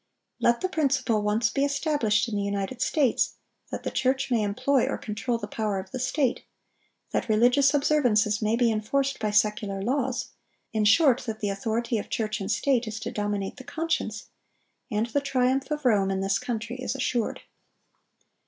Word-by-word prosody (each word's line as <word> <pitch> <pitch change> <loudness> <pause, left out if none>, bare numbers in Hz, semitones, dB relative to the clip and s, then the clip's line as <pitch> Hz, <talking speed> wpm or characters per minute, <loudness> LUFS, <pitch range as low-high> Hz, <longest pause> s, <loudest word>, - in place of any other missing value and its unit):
Let 235 0 +2
the 370 - +1
principle 275 - +1
once 215 +2 +1
be 275 - 0
established 280 -7 +1
in 225 - -4
the 205 - 0
United 200 +5 -3
States, 280 -6 +2 0.3
that - - -5
the - - -3
church 265 +1 0
may 235 -3 +3
employ 255 +6 +1
or - - -2
control 220 +3 -2
the - - -5
power 210 -3 -2
of 190 0 -6
the 255 - -4
state; 260 0 0 0.7
that - - -1
religious 245 +6 +4
observances 245 -8 +2
may 215 +1 +2
be 235 -1 +3
enforced 270 +6 -1
by 215 - 0
secular 210 -1 +1
laws; 255 +4 -1 0.4
in 215 -1 +1
short, 260 +3 +5
that 220 -1 -4
the 205 - -1
authority 225 +3 -1
of - - -7
church 215 -1 -2
and 195 - -4
state 250 +1 +1
is 215 +1 -4
to - - -4
dominate 205 0 -3
the 260 - -9
conscience, 315 -9 -2 0.6
and 215 -1 0
the 260 +5 -1
triumph 265 0 +1
of 300 -2 -3
Rome 200 -5 +3
in 190 0 -1
this 195 +1 +1
country 235 0 -4
is 255 +1 -3
assured. 245 -3 -1
235 Hz, 180 wpm, -26 LUFS, 210-270 Hz, 0.7 s, short